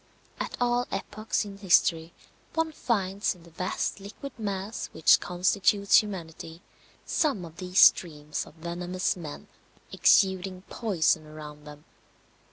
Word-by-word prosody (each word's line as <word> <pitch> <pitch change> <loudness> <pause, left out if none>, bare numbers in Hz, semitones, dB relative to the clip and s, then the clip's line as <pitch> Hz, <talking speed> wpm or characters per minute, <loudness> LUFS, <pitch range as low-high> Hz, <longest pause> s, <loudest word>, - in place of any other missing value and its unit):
At - - -4
all 245 0 +1
epochs 210 +2 -2
in 200 -1 -9
history 170 -4 +3 0.4
one 325 0 0
finds 200 -8 -1
in 175 - -18
the 170 - -16
vast 185 +4 -2
liquid 210 +8 -9
mass 200 0 -4
which 160 - +5
constitutes 195 +3 +3
humanity 170 -4 -8 0.4
some 270 - 0
of 165 0 -13
these 180 0 -5
streams 150 -4 +3
of - - -16
venomous 175 +2 -2
men 160 -5 -8 0.4
exuding 190 -1 +3
poison 170 -8 0
around 150 -1 -10
them. 150 0 -12
185 Hz, 125 wpm, -27 LUFS, 165-205 Hz, 0.4 s, which